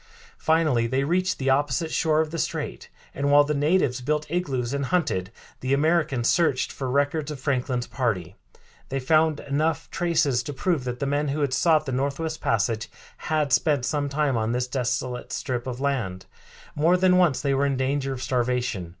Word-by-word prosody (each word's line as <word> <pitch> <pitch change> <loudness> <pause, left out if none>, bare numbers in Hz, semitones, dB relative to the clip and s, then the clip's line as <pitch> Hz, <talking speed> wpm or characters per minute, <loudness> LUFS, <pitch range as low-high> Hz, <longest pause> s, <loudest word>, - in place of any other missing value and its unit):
Finally 155 -8 +2
they 130 +3 0
reached 185 +5 0
the 135 0 +1
opposite 145 +3 0
shore 155 0 +2
of 155 -1 -3
the 165 - -4
strait, - - -4 0.2
and, 140 +1 -1
while 145 0 +7
the 150 +1 -1
natives 145 -3 +1
built 150 +3 -1
igloos 135 -8 -1
and 140 -1 -1
hunted, 130 - 0 0.3
the 130 +2 +1
Americans 150 -5 +1
searched 165 -7 +2
for 130 -2 -4
records 145 +3 0
of 150 -3 -6
Franklin's 130 -2 -1
party. 100 - -2 0.6
They 135 - -2
found 155 +2 +2
enough 155 +3 -1
traces 155 -8 +1
to 145 - -6
prove 150 -1 -1
that 125 -1 -3
the - - +1
men 145 +2 0
who 145 +2 -2
had 140 -3 0
sought 155 +1 +3
the 135 - -3
Northwest 140 +5 -2
Passage 110 0 0 0.4
had 150 -4 +1
spent 145 -6 +2
some 145 -1 -1
time 140 -3 0
on 110 +1 0
this 125 +1 -1
desolate 125 -1 -2
strip 125 -1 -3
of 125 -1 -4
land. 120 -10 -2 0.5
More 165 +5 +3
than 180 0 +4
once 175 -7 +3
they 140 -2 0
were 140 +1 +2
in 135 -2 -1
danger 135 +1 -1
of 130 -1 -5
starvation. 125 -8 -1
140 Hz, 185 wpm, -25 LUFS, 125-155 Hz, 0.6 s, while